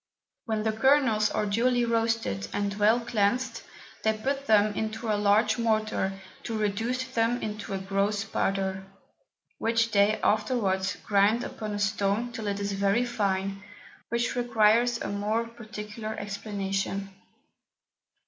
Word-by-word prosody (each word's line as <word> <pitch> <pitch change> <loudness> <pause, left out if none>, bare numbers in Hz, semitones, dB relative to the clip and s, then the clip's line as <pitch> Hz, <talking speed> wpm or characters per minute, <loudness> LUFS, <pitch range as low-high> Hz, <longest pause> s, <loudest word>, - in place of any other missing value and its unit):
When 220 -2 -1
the 220 - +1
Kernels 225 -2 +3
are 210 - -1
duly 240 +4 +2
roasted, 225 - 0
and 200 0 -1
well 215 +4 +3
cleansed, 230 +2 0 0.4
they 220 0 +1
put 275 +5 -2
them 215 -1 +4
into 220 +1 -3
a - - +3
large 210 +2 +3
Mortar 215 -4 0 0.2
to 225 -2 -4
reduce 225 +5 -1
them 245 -2 0
into 210 -1 -4
a - - -1
gross 200 +2 0
Powder, 195 -2 -1 0.8
which 230 0 +1
they 205 +1 +3
afterwards 210 -4 +1
grind 210 +4 +3
upon 215 -1 -5
a - - -2
Stone 205 +3 0
till 225 -2 -5
it 200 0 -1
is 200 0 -2
very 200 +4 +1
fine, 195 -4 -1 0.5
which 235 +1 0
requires 235 0 +3
a - - -4
more 210 +3 -1
particular 215 -1 -7
Explication. 195 -1 -3
215 Hz, 135 wpm, -27 LUFS, 200-230 Hz, 0.8 s, them